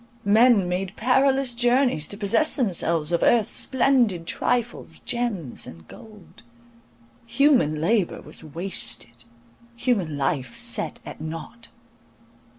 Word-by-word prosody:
Men 215 -1 +5
made 180 +2 -3
perilous 265 +1 +2
journies 245 - +1
to 200 - -6
possess 225 +9 +2
themselves 170 - 0
of 170 - +1
earth's 230 -4 +3
splendid 245 -10 +2
trifles, 240 +6 -2
gems 220 - -2
and 80 0 -12
gold. 210 - -15 0.9
Human 235 - +3
labour 190 +3 0
was - - -8
wasted—human 155 - -5
life 140 - -2
set 235 -9 -1
at - - -9
nought. 165 +9 -8
205 Hz, 105 wpm, -24 LUFS, 160-240 Hz, 0.9 s, Men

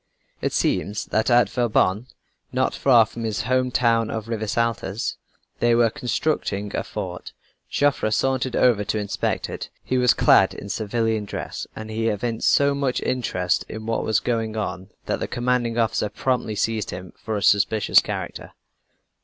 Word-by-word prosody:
It - - 0
seems 105 +1 0
that 110 +3 0
at 120 -3 +5
Vauban, 110 -1 +1 0.4
not - - 0
far 125 -4 +5
away - - +4
from 115 +2 -8
his 110 -2 -1
home 130 +2 +1
town 115 -2 +2
of 110 -1 -4
Rivesaltas, 115 -2 -2 0.4
they 120 0 +3
were 115 -1 +4
constructing 110 -6 -2
a - - -1
fort. - - -6 0.4
Joffre 145 -6 +1
sauntered 130 +2 0
over 115 -5 +3
to 110 - -2
inspect 105 -1 -2
it. - - -6
He 130 - 0
was 125 -1 +4
clad - - +5
in 100 - -8
civilian 110 0 -1
dress - - -5
and 110 0 -7
he 115 +1 -1
evinced 115 +1 0
so 140 0 +4
much 140 -2 0
interest 95 -8 0
in 110 0 -7
what 115 0 -1
was 110 -1 +2
going 115 -2 -2
on 95 -2 -4 0.2
that - - -1
the - - -2
commanding 120 -1 0
officer 115 -2 +1
promptly 125 -4 -1
seized 110 0 -1
him 90 0 -7
for 110 -2 -4
a 100 - -3
suspicious 105 +1 +4
character. - - -5
115 Hz, 165 wpm, -23 LUFS, 105-120 Hz, 0.4 s, at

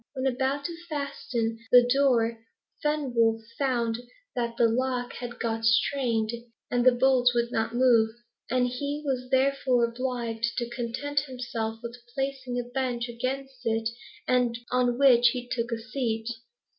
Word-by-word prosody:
When 260 0 -2
about 265 +2 0
to 340 - -3
fasten 250 -6 -2
the 245 0 +9
door, 240 -4 +2 0.4
Fenwolf 240 -7 +1 0.2
found 240 -4 0 0.4
that 235 -1 -2
the 235 - +5
lock 250 +1 -1
had 240 -1 -7
got 225 -1 -2
strained, 225 -1 +2 0.4
and 245 0 +2
the 255 - +7
bolts 245 0 +3
would 235 0 +1
not 225 0 -1
move, 240 -3 +5 0.4
and 250 +1 +2
he 285 +4 -3
was 255 -2 -2
therefore 260 -2 +3
obliged 235 -1 -2
to 240 - -1
content 260 +5 -2
himself 235 -3 -4
with 235 +1 -6 0.2
placing 270 -2 -2
a - - -1
bench 245 -1 -2
against 260 +2 -4
it, 225 -1 0 0.8
on 245 -1 +2
which 250 -3 +6
he 245 -1 -5
took 240 -1 -2
a 230 - 0
seat. 230 -2 -3
245 Hz, 145 wpm, -27 LUFS, 235-265 Hz, 0.8 s, the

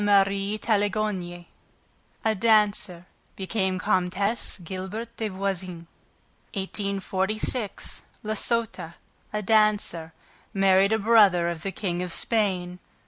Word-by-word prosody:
Marie 200 0 +3
Taglioni, 205 -5 -1 0.8
a 220 - +3
dancer, 210 -5 +2 0.3
became 190 -1 -1
Comtesse 185 +5 0
Gilbert 190 +6 -6
des 220 -1 -2
Voisins. 185 -3 -4 0.7
1846. 200 +3 -2 0.2
La 215 0 -2
Sota, 215 -7 0 0.4
a 210 0 -2
dancer, 210 -6 +2 0.4
married 195 +1 +4
a 220 - +3
brother 200 -5 +5
of 170 -2 -5
the 195 - -3
King 180 -3 -3
of 180 -1 -3
Spain. 185 -4 0
195 Hz, 100 wpm, -26 LUFS, 185-215 Hz, 0.8 s, brother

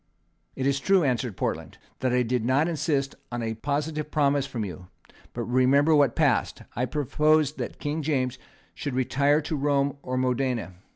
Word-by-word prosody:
"It 130 - -2
is 140 0 +2
true," 190 +4 +3
answered 125 -6 -1
Portland, - - -3 0.2
"that 130 0 0
I 125 0 +3
did 125 0 -1
not 135 +6 +2
insist 145 -4 -1 0.2
on 120 -1 -3
a 110 0 -2
positive 150 +5 -2
promise 140 -2 +2
from 120 -5 -3
you; 90 -1 -8 0.4
but 120 - -4
remember 130 +6 +3
what 145 -5 +4
passed. - - +1
I 125 - 0
proposed 150 +2 +1
that - - -4
King 150 +1 -3
James 135 -5 -1 0.3
should 140 -3 -4
retire 140 +3 +2
to 155 +1 -3
Rome 140 -1 +1
or 130 0 -3
Modena. 125 -5 -1
135 Hz, 170 wpm, -26 LUFS, 125-145 Hz, 0.4 s, what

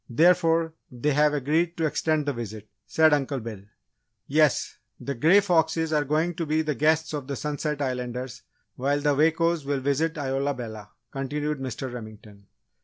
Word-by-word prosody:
Therefore, 165 +3 +3 0.2
they 125 +4 -1
have 150 +1 +4
agreed 160 +5 0
to 165 - 0
extend 155 0 0
the 145 - -1
visit," 110 -3 -7 0.2
said 160 -1 +4
Uncle 140 -1 0
Bill. 110 -4 -7 0.6
"Yes, 150 -1 +1 0.2
the 140 - -4
Grey 160 +11 +5
Foxes 160 -3 +1
are 150 -1 +2
going 155 +5 0
to 165 - -1
be 155 +1 +1
the 155 -1 -1
guests 160 +2 +1
of 145 -3 -4
the 140 - -3
Sunset 150 +1 -3
Islanders, 125 -2 -4 0.4
while 140 +3 +1
the 145 0 +2
Wakos 165 +2 +2
will 140 0 -1
visit 145 +4 0
Isola 140 0 -1
Bella," 110 -4 -8 0.2
continued 145 +2 -3
Mr. 130 0 -5
Remington. 110 -3 -11
145 Hz, 165 wpm, -26 LUFS, 130-160 Hz, 0.6 s, Grey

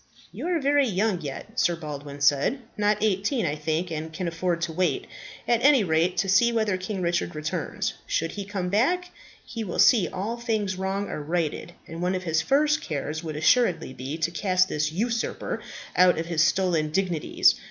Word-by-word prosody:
"You - - -5
are 350 -2 +1
very 285 -1 +3
young 200 -2 0
yet," 180 - -6
Sir 175 -7 +3
Baldwin 145 -3 -7
said, 145 - +2
"not 210 0 +2
eighteen, 210 +3 +1
I 145 - 0
think, 160 +3 -2
and 160 0 -4
can 175 +3 -4
afford 170 +1 -1
to 170 -1 -2
wait, 185 - 0 0.4
at 235 -1 +2
any 275 -5 +6
rate, 170 +1 +1
to 195 - +1
see 195 +5 +4
whether 220 -4 +1
King 185 +1 -4
Richard 170 -1 -1
returns. 155 +1 -3
Should 165 +1 -1
he 205 - -5
come 195 -3 -3
back, 355 - +1 0.3
he 230 -1 -5
will 180 -5 -5
see 225 -8 +5
all 210 +6 -4
these 220 -5 -1
wrongs 190 +2 -2
are - - -4
righted; 165 +2 -2
and 165 +1 -7
one 180 +1 0
of 185 - -3
his 160 -2 +1
first 300 +2 +2
cares 155 0 -4
would 155 -2 -5
assuredly 170 - +2
be 135 +5 -5
to 165 +1 -1
cast 185 +1 +1
this 150 -2 -1
usurper 230 +7 -2 0.3
out 180 -1 +5
of 165 - -2
his 165 -2 0
stolen 165 -2 +1
dignities. 175 -2 +2
185 Hz, 190 wpm, -25 LUFS, 160-220 Hz, 0.4 s, any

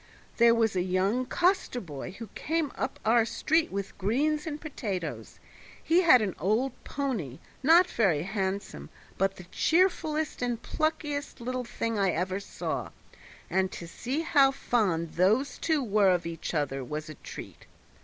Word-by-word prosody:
There 235 0 +6
was 225 -3 +2
a 180 - +2
young 190 +7 0
coster 350 -5 +1
boy 165 - -7
who 230 +3 -8
came 320 -3 -1
up - - -3
our 230 +1 +5
street 320 +7 +1
with 200 0 -4
greens 295 - +1
and 300 -1 -4
potatoes; 200 - -5 0.4
he 335 +3 +4
had 255 -10 +6
an 195 -4 -2
old 220 - +1
pony, 225 - -3 0.2
not 330 +6 +7
very 190 - +1
handsome, 195 0 -3 0.3
but 195 0 +1
the 180 - -10
cheerfullest 315 - +1
and 240 -2 -1
pluckiest 295 0 -2
little 250 +1 -3
thing 230 -1 -2
I 195 -1 +3
ever 185 +3 -1
saw, 200 - -4 0.6
and 190 0 0
to 170 - -7
see 255 - -3
how 285 -4 +5
fond 190 - 0
those 215 +10 +2
two 315 -4 +1
were 205 -3 +3
of 180 -2 +1
each 165 0 -5
other 135 -3 -1
was 150 +5 -5
a 155 - -7
treat. - - -10
225 Hz, 155 wpm, -28 LUFS, 185-285 Hz, 0.6 s, not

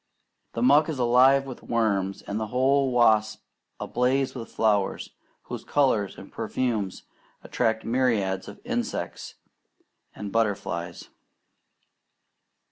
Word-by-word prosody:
The 115 - -2
muck 145 +5 +5
is 155 - -3
alive 130 +3 +4
with 130 -2 -8
worms; 100 -4 -1
and 100 +2 -4
the 110 - -3
whole 130 +3 +2
swamp 110 -3 +5 0.6
ablaze 130 +2 0
with 120 -3 -8
flowers, 105 -3 0 0.3
whose - - -7
colours 130 -9 +1
and - - -12
perfumes 110 -7 -2 0.4
attract 110 0 -1
myriads 115 -6 0
of - - -10
insects - - -4 0.8
and 100 -1 -6
butterflies. 95 -6 -2
115 Hz, 110 wpm, -26 LUFS, 105-130 Hz, 0.8 s, muck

